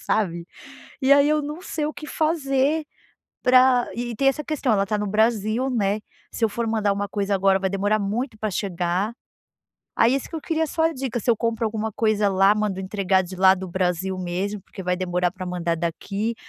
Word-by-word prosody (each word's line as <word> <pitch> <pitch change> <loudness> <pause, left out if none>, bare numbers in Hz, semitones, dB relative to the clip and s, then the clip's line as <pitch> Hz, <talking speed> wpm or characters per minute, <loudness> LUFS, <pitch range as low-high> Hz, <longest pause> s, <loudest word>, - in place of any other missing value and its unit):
sabe, 170 -5 -1 0.6
e 265 +1 +3
aí 280 0 +6
eu 305 0 +2
não 300 +4 -6
sei 315 -4 -3
o 305 - -3
que 300 - -9
fazer 300 -1 +1 0.6
para 255 -1 +5
e 240 -1 -4
tem 275 - +1
essa 275 +3 0
questão. 300 -6 -1
Ela 200 -2 +2
tá 210 - 0
no 210 - -2
Brasil, 220 +4 +1
né, 210 -3 0 0.3
se 230 - -1
eu - - +3
for 235 +2 -3
mandar 215 -2 +1
uma 200 0 -3
coisa 200 0 -1
agora, 195 0 +3
vai 190 0 0
demorar 205 +2 +1
muito 220 +4 -2
para 215 0 -2
chegar. 185 +1 -1 0.8
Aí 235 +3 +4
isso 275 - -3
que 330 - -5
eu - - -4
queria 320 0 -1
só 320 +2 -1
a 325 - +2
dica. 260 -2 -3
Se 240 - -9
eu 230 - +3
compro 230 +1 -1
alguma 220 0 -3
coisa 215 -1 +1
lá, 195 +1 +4
mando 210 -3 -1
entregar 190 -1 +1
de 185 +1 -8
lá 190 +1 +6
do 190 0 -7
Brasil 185 +1 -1
mesmo, 185 +3 -3
porque 195 +1 -10
vai 180 0 0
demorar 180 -1 0
para 185 +1 -8
mandar 175 -2 -2
daqui, 195 +7 -3
210 Hz, 210 wpm, -23 LUFS, 190-255 Hz, 0.8 s, aí